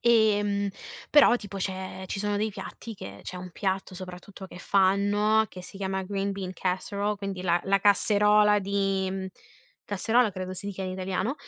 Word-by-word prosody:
Ehm, 205 -3 +3 0.4
però 290 -5 +7
tipo 205 -4 -8
c'è 190 0 -4
ci 195 - -4
sono 205 0 0
dei 215 +1 0
piatti 210 +3 -8
che 100 - -9
c'è 185 - -7
un 180 0 -7
piatto 190 +1 -2
soprattutto 185 +1 -9
che 180 - -11
fanno, 205 +3 +3
che 180 - -10
si 190 - -12
chiama 190 -1 -2
green 200 +1 -2
bean 190 -2 -5
casserole 200 +3 -2
quindi 195 -2 -5
la 175 -1 +2
la 195 0 +2
casserola 210 +1 +4
di 195 -1 -1 0.6
casserola 220 +4 +2
credo 185 -1 -5
si 185 +2 -8
dica 195 -1 -4
in 185 - -3
italiano 185 +5 -2
195 Hz, 165 wpm, -27 LUFS, 185-205 Hz, 0.6 s, però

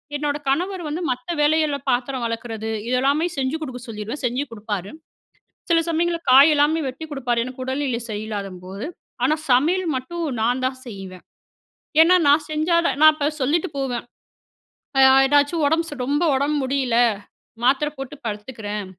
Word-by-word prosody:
என்னோட 290 0 -1
கணவர் 360 +6 -1
வந்து 315 +4 -3
மத்த 250 +7 -4
வேலைகள்ல 300 -1 +2
பாத்திரம் 255 0 -1
வெளக்கறது 225 -1 -4 0.2
இதெல்லமே 275 +6 +2
செஞ்சு 265 +3 -1
கொடுக்க 260 -4 -6
சொல்லிருவேன். 225 +6 -6
செஞ்சு 250 +3 0
கொடுப்பாரு. 205 -3 -5 0.8
சில 335 -1 +4
சமயங்கள்ல 335 +1 0
காய் 275 +4 +8
எல்லாமே 300 +3 +3
வெட்டி 260 +5 -6
கொடுப்பாரு. 245 -4 -1
எனக்கு 255 0 -8
உடல்நிலை 260 -2 -2
சரியில்லாத 210 -2 -4 0.2
போது 195 +6 -6 0.4
ஆனா 300 +4 +3 0.2
சமையல் 335 +8 +3
மட்டும் 335 +7 -4 0.2
நான் 245 +3 +1
தான் 260 0 -2
செய்வேன். 190 -4 -9 0.8
ஏன்னா, 360 +3 +6
நான் 295 +1 +4
செஞ்சா 310 +3 +1
தான் 270 - 0
நான் 310 0 +8
இப்போ 295 -1 -1
சொல்லிட்டு 315 +7 +1
போவேன். 255 -3 -2 1.0
அ - - +6 0.3
ஏதாச்சும் 290 +3 +2
உடம்பு 320 +1 0
ரொம்ப 290 +6 0
உடம்பு 285 +3 +1
முடியல, 260 -3 0 0.7
மாத்திரை 275 +4 +2
போட்டு 270 +2 -7
படுத்துக்கிறேன், 210 -1 -5
270 Hz, 145 wpm, -22 LUFS, 240-305 Hz, 1.0 s, காய்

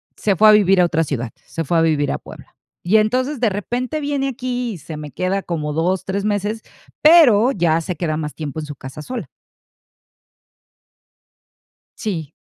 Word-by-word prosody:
se 200 -3 0
fue 215 +4 +6
a - - +9
vivir 195 -3 +5
a 175 - +5
otra 165 -1 +1
ciudad, 125 -6 -3 0.2
se 165 - -4
fue 165 +3 0
a - - +4
vivir 150 -3 +1
a - - -1
Puebla, - - -14 0.3
y 200 +5 +3
entonces, 255 +6 0
de 230 -3 +2
repente 245 +9 -3
viene 285 -1 -1
aquí 250 -1 -3
y - - -8
se 155 +1 -8
me 150 -2 -8
queda 185 +6 -1
como 150 -3 -3
2, 175 +4 0
3 200 +1 -2
meses, 210 +1 -1 0.4
pero 270 -8 +7
ya 165 -7 +1
se 180 +2 -4
queda 155 -3 -2
más 150 -1 -4
tiempo 155 0 -6
en 155 - -5
su 150 -1 -8
casa 135 +3 -9
sola. 250 +8 -5 2.7
Sí. 165 - -4
190 Hz, 185 wpm, -20 LUFS, 160-230 Hz, 2.7 s, a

